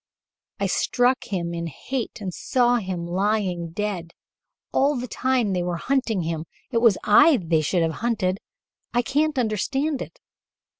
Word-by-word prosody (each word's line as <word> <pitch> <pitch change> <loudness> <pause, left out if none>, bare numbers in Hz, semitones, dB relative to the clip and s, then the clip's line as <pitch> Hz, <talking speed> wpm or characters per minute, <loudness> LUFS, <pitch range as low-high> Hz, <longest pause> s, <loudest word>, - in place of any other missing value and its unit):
I - - +1
struck 250 +1 +1
him 170 -4 -3
in 170 0 -3
hate 235 - -5
and 185 -3 -4
saw 245 +3 +2
him 185 -5 -3
lying 185 -1 0
dead: 175 -2 -4 0.6
all 285 +2 +3
the 250 - -4
time 250 -5 0
they 180 - 0
were 175 -1 -2
hunting 245 -5 0
him 160 -1 -3 0.3
it 235 - +2
was 230 -5 +5
I 270 +8 +6
they 165 -4 +1
should 170 +3 +1
have 165 - +1
hunted. 210 -5 0 0.6
I 240 - +3
can't 295 +3 +1
understand 265 +6 0
it. - - -8
210 Hz, 155 wpm, -24 LUFS, 175-250 Hz, 0.6 s, I